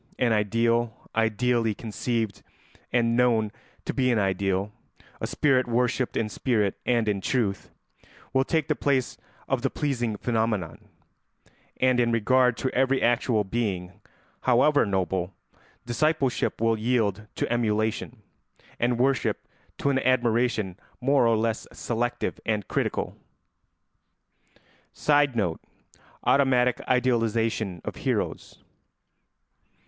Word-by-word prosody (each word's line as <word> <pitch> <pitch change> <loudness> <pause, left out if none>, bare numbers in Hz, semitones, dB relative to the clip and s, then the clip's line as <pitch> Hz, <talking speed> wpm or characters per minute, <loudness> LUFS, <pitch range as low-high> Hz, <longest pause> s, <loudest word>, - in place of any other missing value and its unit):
An 120 -3 +2
ideal, 115 +2 0
ideally 115 0 +1
conceived 110 0 -3 0.5
and 115 -1 +2
known 115 -4 +2 0.3
to - - -2
be 130 -2 +1
an 120 - +2
ideal, 95 0 0 0.5
a - - -3
spirit 130 -4 +2
worshipped 120 +1 0
in 110 - 0
spirit 105 -3 0
and 120 -3 +2
in 100 -2 0
truth, 105 -4 -1 0.6
will 130 0 +3
take 160 +1 0
the - - +1
place 135 -3 0 0.3
of 130 -2 0
the 135 - +1
pleasing 120 -8 -2
phenomenon; 110 -7 -2 0.9
and 130 -1 +3
in 120 -1 +2
regard 125 +2 +3
to 130 - -2
every 135 +1 +2
actual 120 -2 +2
being, 95 -4 -3 0.4
however 130 +1 +4
noble, 95 -1 -1 0.5
discipleship 135 +2 0
will 115 -1 +1
yield 110 -3 0
to - - -1
emulation, 110 -2 -1 0.6
and 120 0 +1
worship 130 +2 0 0.3
to 140 - +1
an 135 - +1
admiration 120 -6 +1 0.2
more 135 -1 +3
or 115 -1 +3
less 110 0 -1
selective 120 +1 -2
and 105 -3 -1
critical. - - -2 1.8
[Sidenote: 130 - +2 0.6
Automatic 125 -3 +3
idealisation 115 -6 0
of - - -5
heroes. - - -3
115 Hz, 110 wpm, -26 LUFS, 110-125 Hz, 1.8 s, however